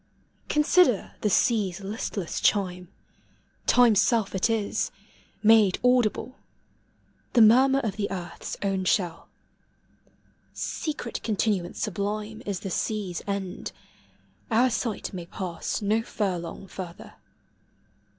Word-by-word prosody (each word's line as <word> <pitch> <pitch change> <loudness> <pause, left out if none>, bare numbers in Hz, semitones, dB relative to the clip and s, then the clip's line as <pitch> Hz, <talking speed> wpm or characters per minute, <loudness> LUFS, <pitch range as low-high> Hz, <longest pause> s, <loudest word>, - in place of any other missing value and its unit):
Consider 300 - +3
the 210 - +1
sea's 200 -3 +2
listless 195 -2 -4
chime: 180 -3 +1 0.8
Time's 235 -5 +6
self 225 -4 +1
it 190 +4 +1
is, 220 -3 0 0.5
made 215 -3 +6
audible 250 0 +2 0.4
— - - -39
The 235 - +7
murmur 260 +5 +6
of 215 -5 -3
the 205 -1 -1
earth's 175 -3 -6
own 195 -1 0
shell. 175 -4 0 1.3
Sec 310 -5 -4
ret 235 - -5
continuance 205 -5 -1
sublime 210 +2 -3
Is 200 -3 -2
the 195 - -5
sea's 200 -3 -2
end: 195 -2 -4 0.8
our 245 +2 +3
sight 225 -2 -3
may 175 -2 -6
pass 180 +2 -4
No 215 +3 +2
furlong 190 -5 -3
further. 180 -2 -9
205 Hz, 110 wpm, -26 LUFS, 185-225 Hz, 1.3 s, The